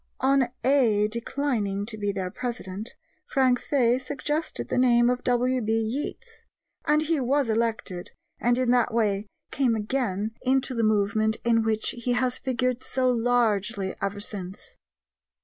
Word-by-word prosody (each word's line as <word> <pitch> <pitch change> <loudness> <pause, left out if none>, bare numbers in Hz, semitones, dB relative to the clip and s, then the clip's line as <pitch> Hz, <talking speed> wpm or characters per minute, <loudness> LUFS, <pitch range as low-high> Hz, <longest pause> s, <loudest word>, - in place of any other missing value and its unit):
On 265 -1 +3 0.2
"Æ" 235 -7 +4
declining 230 -4 -2
to 220 0 -7
be 205 -1 -1
their 190 -2 -4
president, 225 -4 -5 0.3
Frank 255 -3 +2
Fay 250 -3 +2
suggested 295 +4 -3
the - - 0
name 240 -1 +4
of 250 - -3
W.B. 245 -2 +1
Yeats, 270 - -3 0.4
and 300 +1 +3
he 315 -1 +1
was 270 0 +1
elected, 220 -5 -1 0.3
and 240 +1 +2
in 255 -1 +2
that 245 -1 +3
way 210 -2 0 0.2
came 255 -4 +2
again 215 -2 -1
into 265 0 +1
the 230 - -1
movement 215 0 +2
in 230 -1 +3
which 220 -1 0
he 245 +1 -2
has 250 +1 0
figured 255 -1 -1
so 255 -1 +1
largely 225 -4 +1
ever 200 +1 -2
since. 205 - -7
240 Hz, 145 wpm, -26 LUFS, 215-255 Hz, 0.4 s, Æ